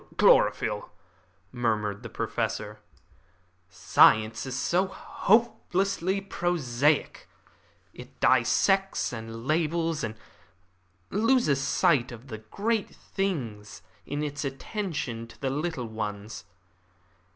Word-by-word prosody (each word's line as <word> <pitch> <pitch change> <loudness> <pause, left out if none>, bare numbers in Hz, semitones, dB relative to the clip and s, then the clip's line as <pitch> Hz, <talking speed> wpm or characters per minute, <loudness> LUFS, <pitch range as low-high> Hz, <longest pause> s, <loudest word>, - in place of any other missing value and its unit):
"Chlorophyll," - - +3 0.6
murmured 105 -4 -1
the - - -8
Professor. - - -3 0.9
"Science 110 +4 +4
is 130 0 -3
so 180 +7 +1
hopelessly 195 -2 +1
prosaic. 155 -7 0 0.6
It - - -13
dissects 195 -7 +2
and 115 0 -7
labels, 165 +1 0
and 110 -1 -3 1.0
loses 215 - +2
sight 140 -2 +2
of 120 +3 -11
the 110 -2 -6
great 205 - -2
things 115 - -4 0.2
in 145 +1 -3
its 145 -1 -4
attention 135 - -4
to - - -16
the 135 -1 -1
little 150 -2 -2
ones. 105 -2 -5
140 Hz, 95 wpm, -27 LUFS, 115-185 Hz, 1.0 s, Science